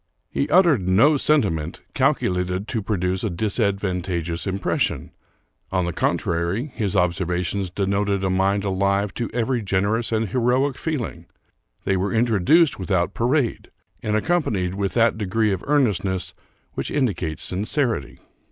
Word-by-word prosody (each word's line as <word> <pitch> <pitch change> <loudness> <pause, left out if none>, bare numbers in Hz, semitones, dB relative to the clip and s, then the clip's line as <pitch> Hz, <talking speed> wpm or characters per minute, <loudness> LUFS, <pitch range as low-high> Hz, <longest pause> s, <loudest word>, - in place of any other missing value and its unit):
He 70 - -1
uttered 160 - +4
no 115 +12 +5
sentiment 100 - +1
calculated 90 +2 0
to 115 - -1
produce 95 -2 -1
a 110 - 0
disadvantageous 95 -4 -1
impression; 95 0 -1 0.6
on 90 -2 +1
the 85 - -3
contrary, 85 - -1
his 105 -5 -2
observations 90 +1 0
denoted 100 +1 0
a 95 - +1
mind 95 +2 +1
alive 100 0 0
to 120 - -3
every 120 +1 0
gen 95 -2 0
erous 110 +3 0
and 110 -2 0
heroic 130 +3 +1
feeling. 120 - -4 0.6
They 95 - +1
were 95 +2 -1
introduced 120 - +3
without 95 0 0
parade, 125 +1 0 0.3
and 105 0 -1
accompanied 110 - 0
with 100 0 -2
that 115 -1 +3
degree 105 +1 +1
of 95 -2 -3
earnestness 100 -10 +1 0.4
which - - -3
indicates 95 - -1
sincerity. 110 - -2
100 Hz, 135 wpm, -23 LUFS, 90-115 Hz, 0.6 s, no